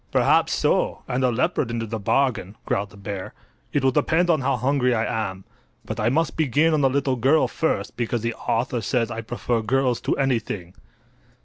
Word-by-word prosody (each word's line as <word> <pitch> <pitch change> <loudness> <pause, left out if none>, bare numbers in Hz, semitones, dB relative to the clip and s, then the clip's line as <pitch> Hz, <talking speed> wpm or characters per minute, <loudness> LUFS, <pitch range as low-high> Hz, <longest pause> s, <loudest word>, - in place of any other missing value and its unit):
"Perhaps - - +3
so, - - +1
and 125 +1 -1
a 130 - +4
leopard 125 +2 0
into 115 -1 -2
the 110 0 -4
bargain," 110 -3 0
growled 100 +1 -1
the 105 - -16
bear. 100 -1 -6 0.4
"It 145 - 0
will 135 - +4
depend 160 +5 +2
on 155 -4 +2
how 135 0 +1
hungry 125 0 +1
I 110 -1 -1
am. 95 0 -10 0.4
But - - -5
I 110 - +2
must 160 +5 0
begin 155 +2 +2
on 155 - +2
the 135 - +4
little 135 0 0
girl 135 +7 +3
first, 160 - -2
because 120 -1 -1
the 115 0 -1
author 120 +2 -1
says 115 +2 0
I 115 0 -4
prefer 120 0 -2
girls 125 +2 +1
to - - -1
anything." 115 -9 -1
125 Hz, 195 wpm, -23 LUFS, 115-135 Hz, 0.4 s, a